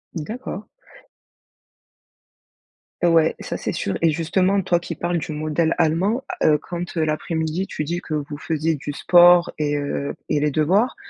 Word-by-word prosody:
D'accord. 210 - -6 2.4
Ouais, 165 -2 +4
ça, - - -5
c'est - - -3
sûr. 100 - -2
Et 165 - +4
justement, 185 +5 +1
toi 175 -1 +2
qui 175 - -6
parles 175 0 -1
du 155 - -6
modèle 155 +2 0
allemand, 180 +10 +1 0.2
heu, 150 - +5
quand 175 +4 -6
l'après-midi 160 +3 -1
tu - - -4
dis 170 +4 -3
que 155 - -4
vous 145 0 -4
faisiez 160 0 -1
du 145 0 -5
sport 175 +3 +5
et 145 -1 0
heu, 145 0 -3
et - - +2
les 150 +1 +1
devoirs, 180 - +2
165 Hz, 150 wpm, -22 LUFS, 150-175 Hz, 2.4 s, heu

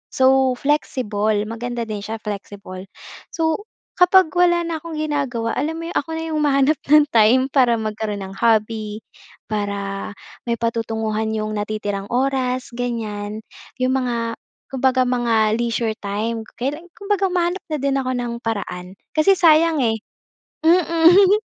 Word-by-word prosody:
So 260 -1 +4
flexible, 220 -7 0
maganda 235 +2 -4
din 215 -2 -5
siya, 220 +2 -5
flexible. 200 -2 -7 0.5
So 325 +6 -1 0.3
kapag 360 -1 +5
wala 350 -1 +3
na 330 -2 -3
akong 330 0 -8
ginagawa 280 -7 -2
alam 315 +2 -1
mo 335 - -5
'yong - - -1
ako 290 - -2
na 325 - -3
'yong 320 -1 -3
humahanap 285 0 +2
ng 300 0 +6
time 230 +3 +5
para 250 -4 +4
magkaroon 215 -2 -3
ng 190 - -8
hobby, 215 -1 0 0.5
para 200 -1 -3 0.4
may 235 - +1
patutunguhan 220 -1 -2
'yong 215 0 -2
natitirang 205 -1 -3
oras, 255 0 -1
ganyan. 220 -3 -4 0.3
'Yong 255 0 0
mga 255 -2 0 0.6
kumbaga 260 -1 +2
mga 240 -2 0 0.2
leisure 230 -2 -1
time, 220 +3 -3
kailan 295 +7 -4
kumbaga 400 -2 0
humahanap 360 0 -1
na 310 - -2
din 275 -1 0
ako 255 -1 -2
ng 245 -1 -3
paraan 195 -5 -5 0.2
kasi 320 +5 +4
sayang 325 -4 +4
eh. 225 -1 0 0.6
Mm. 350 +4 +5
245 Hz, 140 wpm, -21 LUFS, 215-305 Hz, 0.6 s, ng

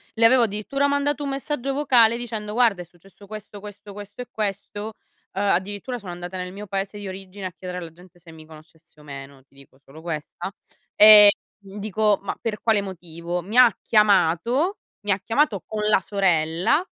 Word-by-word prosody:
le 230 0 +3
avevo 250 +1 +6
addirittura 230 +7 -1
mandato 285 +1 0
un 280 - -3
messaggio 275 -1 -3
vocale 245 -5 +4
dicendo: 220 -3 -5
"Guarda, 225 -6 +2
è 175 - -9
successo 190 +4 -20
questo, 210 -1 -9
questo, 205 0 -11
questo 205 +3 -9
e 245 - -8
questo", 205 +1 -4 0.4
ehm, 195 - -2
addirittura 205 +7 -3
sono 185 -4 -8
andata 175 +1 -7
nel 180 0 -5
mio 205 +2 -8
paese 195 +1 -4
di 205 - -7
origine 190 +1 -8
a 185 - -4
chiedere 180 +1 -7
alla 170 -2 -8
gente 180 +2 -19
se 170 -1 -15
mi 160 -1 -13
conoscesse 160 +1 -18
o - - -16
meno, 135 -1 -10
ti 135 - -35
dico 140 -1 -19
solo 140 +3 -16
questa. 165 +2 -5 0.5
Ehm, 210 -1 +10 0.3
dico 205 +1 -1
ma - - -4
per 220 -3 -3
quale 220 -3 +2
motivo: 175 -2 -6
mi 205 +7 -5
ha 245 -2 +8
chiamato 215 - +2 0.3
mi 205 - -1
ha 195 - +1
chiamato 225 - 0
con 215 -1 -4
la 210 - +4
sorella, 180 - +1
200 Hz, 185 wpm, -23 LUFS, 175-220 Hz, 0.5 s, Ehm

